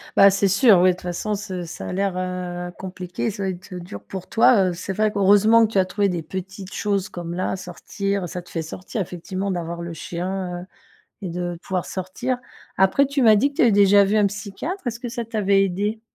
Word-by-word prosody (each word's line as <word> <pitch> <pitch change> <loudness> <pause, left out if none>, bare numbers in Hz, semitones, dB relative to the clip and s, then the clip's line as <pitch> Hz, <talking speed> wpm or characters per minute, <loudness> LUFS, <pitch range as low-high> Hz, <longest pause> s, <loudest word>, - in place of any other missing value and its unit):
Bah, 200 - +8
c'est 195 +1 +2
sûr, 200 0 +6
oui, 185 - +6
de - - +3
toute 180 - -12
façon, 180 +4 -3
c'est 190 -3 -4
ça 165 - -7
a - - -4
l'air, 195 0 0
heu, 180 -1 -4
compliqué. 185 +3 -4
Ça - - -10
doit 190 - 0
être, 185 +1 -8
heu, 180 - -5
dur 175 +1 -9
pour 190 -2 -8
toi. 220 -4 +5
Heu, - - -3
c'est 185 +3 -5
vrai 215 +2 +1
que, 205 - -6
heureusement 205 +3 +6
que 220 - -4
tu 195 - +3
as 185 - +3
trouvé 200 +1 0
des 175 -2 -2
petites 190 +4 -7
choses 200 -2 -1
comme 170 -1 -6
là, 185 +2 -1
sortir, 190 +1 -4
ça 180 +1 -6
te - - -17
fait 165 - -2
sortir, 180 +6 -5
effectivement, 185 +2 -4
d'avoir 170 -2 -3
le 170 0 -5
chien, 180 +1 -4
heu, - - -10 0.6
et 190 - -3
de 175 0 -3
pouvoir 185 -2 -2
sortir. 195 +8 -3 0.4
Après, 190 +9 +4
tu 280 0 0
m'as 220 -3 +7
dit 275 +7 +3
que - - -22
tu - - +5
avais 240 - +6
déjà 200 0 +6
vu 200 +2 +1
un 210 -1 +4
psychiatre. 205 - -5
Est-ce 235 -1 -4
que 245 0 -5
ça 235 0 -4
t'avait 200 -3 +2
aidée? 205 +4 -2
190 Hz, 240 wpm, -23 LUFS, 180-205 Hz, 0.6 s, Bah